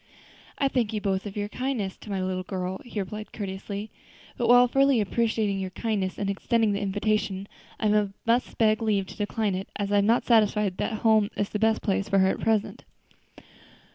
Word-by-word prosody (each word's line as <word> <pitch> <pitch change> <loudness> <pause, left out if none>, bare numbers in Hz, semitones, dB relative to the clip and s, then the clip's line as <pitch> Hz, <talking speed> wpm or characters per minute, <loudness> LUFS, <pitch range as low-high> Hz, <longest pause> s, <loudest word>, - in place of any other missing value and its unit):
"I 275 - +2
thank 240 -5 0
you 215 - -1
both 195 -2 0
for 195 - -11
your 205 0 -1
kind 255 +3 -2
attention 190 -2 -4
to - - -11
my 195 -2 -2
little 185 0 -2
girl," 185 0 -4
he 230 -3 -5
replied 210 +2 -5
courteously, 200 +1 -5 0.4
"but 240 - -1
while 245 0 +7
fully 270 0 +3
appreciating 215 -1 0
your 190 -1 -3
kindness 195 -2 -2
in 200 - -2
extending 220 +2 +1
the 200 - -2
invitation, 200 -1 -1 0.3
I 210 -1 +2 0.2
must 235 +2 +1
beg 215 0 +3
leave 210 -3 +1
to - - -11
decline 210 0 -1
it, 190 +1 -4
as 200 -1 -2
I 205 - +4
am 225 +4 +3
satisfied 210 -4 +2
that 220 -1 -3
home 220 -2 +4
is 205 - -1
the 210 - -3
best 220 0 +2
place 200 0 0
for 195 - +3
her 190 0 +4
at - - -2
present." 220 -2 0
210 Hz, 200 wpm, -26 LUFS, 195-225 Hz, 0.4 s, while